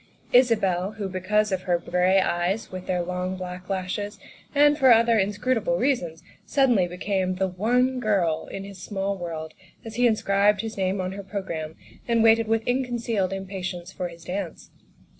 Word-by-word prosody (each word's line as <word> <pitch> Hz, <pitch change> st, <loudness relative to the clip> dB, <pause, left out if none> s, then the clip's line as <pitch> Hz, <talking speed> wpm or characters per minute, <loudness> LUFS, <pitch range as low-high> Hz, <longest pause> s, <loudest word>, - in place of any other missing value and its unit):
Isabel, 210 Hz, -6 st, +3 dB
who 210 Hz, -2 st, -4 dB
because 200 Hz, +3 st, 0 dB
of 190 Hz, -1 st, 0 dB
her 175 Hz, -1 st, +1 dB
gray 180 Hz, +2 st, +2 dB
eyes 180 Hz, +4 st, -1 dB
with 185 Hz, -1 st, -7 dB
their 180 Hz, -1 st, 0 dB
long, 180 Hz, +1 st, -3 dB
black 180 Hz, 0 st, -7 dB
lashes, 195 Hz, +2 st, -3 dB, 0.4 s
and 290 Hz, +1 st, +6 dB
for 265 Hz, -4 st, +5 dB
other 230 Hz, -1 st, +5 dB
inscrutable 205 Hz, -1 st, 0 dB
reasons, 175 Hz, -, -1 dB, 0.2 s
suddenly 245 Hz, -10 st, +3 dB
became 185 Hz, +1 st, -1 dB
the 190 Hz, +1 st, 0 dB
One 245 Hz, +8 st, +1 dB
Girl 180 Hz, -8 st, 0 dB
in 195 Hz, -, -5 dB
his 195 Hz, -2 st, -10 dB
small 195 Hz, 0 st, -2 dB
world 165 Hz, -3 st, -6 dB, 0.3 s
as 225 Hz, 0 st, -7 dB
he 245 Hz, 0 st, +5 dB
inscribed 205 Hz, -2 st, +2 dB
his 225 Hz, 0 st, -5 dB
name 190 Hz, 0 st, -1 dB
on 185 Hz, 0 st, -2 dB
her 200 Hz, +1 st, -6 dB
programme 170 Hz, -6 st, -5 dB, 0.3 s
and 230 Hz, -1 st, +3 dB
waited 225 Hz, 0 st, +5 dB
with 225 Hz, 0 st, +1 dB
ill 255 Hz, +2 st, +1 dB
concealed 230 Hz, -6 st, -1 dB
impa 195 Hz, 0 st, -5 dB
tience 180 Hz, -1 st, -5 dB
for 180 Hz, -, -3 dB
his 170 Hz, -1 st, -12 dB
dance. 180 Hz, -1 st, -5 dB
195 Hz, 175 wpm, -25 LUFS, 180-225 Hz, 0.4 s, and